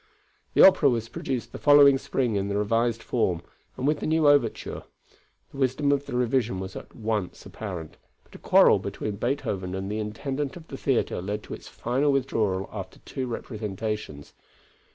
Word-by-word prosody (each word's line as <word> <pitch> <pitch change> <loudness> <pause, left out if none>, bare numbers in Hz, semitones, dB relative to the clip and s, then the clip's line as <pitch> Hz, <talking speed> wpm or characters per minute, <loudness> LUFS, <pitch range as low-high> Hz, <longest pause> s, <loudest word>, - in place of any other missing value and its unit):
The - - +7
opera 165 -7 +6
was 115 -2 -1
produced 130 -3 -4
the - - -8
following 145 -2 +7
spring 125 -5 -1
in 100 0 0
the 100 0 -1
revised 115 +2 0
form 90 -8 0 0.3
and 130 - -3
with 150 +1 +2
the - - -3
new 160 -1 +3
overture. 145 -6 +2 0.7
The - - -12
wisdom 135 +2 +1
of 140 0 0
the 130 - -4
revision 120 -5 +1
was 95 0 -6
at - - -10
once 110 -5 -3
apparent, 90 -7 -7 0.3
but - - -24
a - - -11
quarrel - - +5
between 105 -2 -4
Beethoven 100 -7 -2
and 95 +1 -4
the 105 - -2
intendant 135 +8 -3
of 165 -2 -14
the 135 - -6
theatre 135 -9 0
led 105 +3 -4
to - - -8
its - - -9
final 135 +5 0
withdrawal 110 -8 0
after - - -7
two 130 -1 -4
representations. 105 - -5
115 Hz, 175 wpm, -26 LUFS, 105-135 Hz, 0.7 s, The